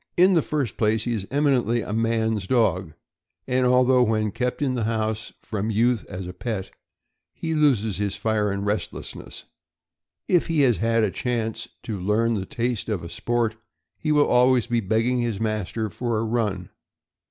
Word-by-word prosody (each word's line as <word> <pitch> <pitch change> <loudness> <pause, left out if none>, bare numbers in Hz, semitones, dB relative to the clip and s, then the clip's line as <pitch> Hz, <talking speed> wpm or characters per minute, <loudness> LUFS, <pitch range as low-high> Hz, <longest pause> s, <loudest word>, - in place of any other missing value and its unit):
In 185 +2 +6
the 165 - +4
first 140 -8 -2
place, 110 0 +1
he 120 - -1
is 100 -3 -3
eminently 130 -5 +2
a 105 - -5
man's 110 -3 0
dog; 95 -9 +1 0.5
and 130 0 +2
although 125 0 +4
when 110 -3 +1
kept 125 +4 -2
in 130 -2 +1
the 120 -4 -1
house 110 -1 -2
from 105 0 -3
youth 115 +2 +2
as 95 -2 -6
a 90 - -7
pet 100 -1 -4 0.6
he 160 -1 -3
loses 120 - +2
his 100 -1 -1
fire 110 -2 0
and 100 0 -2
restlessness, 105 +1 -4 0.8
if 175 -2 +3
he 165 -3 +2
has 125 -5 +4
had 115 0 +2
a 105 - +1
chance 115 +1 -2 0.2
to 105 -4 -4
learn 110 +5 +2
the 95 -4 -3
taste 120 -2 -2
of 85 -5 -3
sport, 115 -2 -1 0.4
he 155 - -2
will 150 -1 +5
always 125 -1 +4
be 120 -1 0
begging 115 +4 +1
his 115 -4 -1
mas 110 -3 -2
ter 110 -1 -2
for 115 +2 -2
a 110 - 0
run. 110 -5 -1
115 Hz, 175 wpm, -24 LUFS, 105-125 Hz, 0.8 s, In